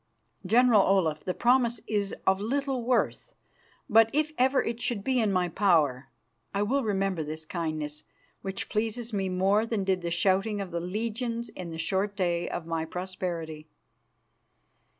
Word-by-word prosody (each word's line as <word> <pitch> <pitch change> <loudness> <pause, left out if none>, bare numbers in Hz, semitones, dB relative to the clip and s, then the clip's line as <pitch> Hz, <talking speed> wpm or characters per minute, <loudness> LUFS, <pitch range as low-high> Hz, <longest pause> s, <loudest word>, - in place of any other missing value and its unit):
General 235 0 +6
Olaf, 180 -6 +2
the 185 - -1
promise 240 -1 +3
is 205 -2 -1
of 190 +1 +3
little 270 +3 -1
worth, 255 - 0 0.5
but, 225 +1 +6
if 305 +1 +1
ever 260 +1 +3
it 230 +1 -3
should 215 -5 -1
be 260 +1 +1
in 215 -3 +2
my 180 -2 +2
power, 160 -8 +2 0.5
I 200 - +2
will 270 +6 +1
remember 195 -5 0
this 155 +1 -6
kindness, 155 -3 -4 0.4
which 195 0 -4
pleases 225 +2 -2
me 195 -2 0
more 195 +4 +2
than 225 -4 -1
did 190 -1 0
the 170 - -2
shouting 195 +4 +1
of 195 -2 -5
the 170 - -2
legions 230 +5 -3
in 180 -2 -7
the 165 - -6
short 195 +5 -1
day 175 -3 0
of 170 - -4
my 165 -1 -2
prosperity." 170 -3 -5
195 Hz, 160 wpm, -28 LUFS, 175-230 Hz, 0.5 s, General